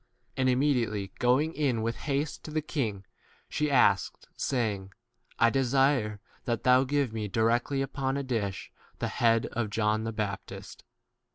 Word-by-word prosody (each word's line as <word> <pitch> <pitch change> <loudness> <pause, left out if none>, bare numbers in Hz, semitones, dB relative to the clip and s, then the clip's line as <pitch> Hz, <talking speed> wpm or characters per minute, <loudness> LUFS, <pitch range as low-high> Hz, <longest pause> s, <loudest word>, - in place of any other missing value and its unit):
And 130 -1 +2
immediately 120 -7 +1
going 130 +6 +3
in 130 -7 0
with 115 0 -1
haste 145 0 -2
to - - -6
the 155 0 -1
king, 110 - -3 0.4
she 150 0 -1
asked, 105 -9 +2
saying, 105 -7 -2 0.4
I 115 0 +4
desire 135 -5 +2 0.3
that 120 -2 -1
thou 125 +1 +5
give 140 -3 0
me 110 -2 -3
directly 120 +6 +1
upon 135 0 -2
a 140 - -2
dish 110 -7 -3 0.3
the - - -2
20 - - -8
head 115 -1 +4
of 120 -3 -2
John 110 +1 +1
the 115 - -2
baptist. 105 -3 -5
120 Hz, 155 wpm, -29 LUFS, 110-135 Hz, 0.4 s, thou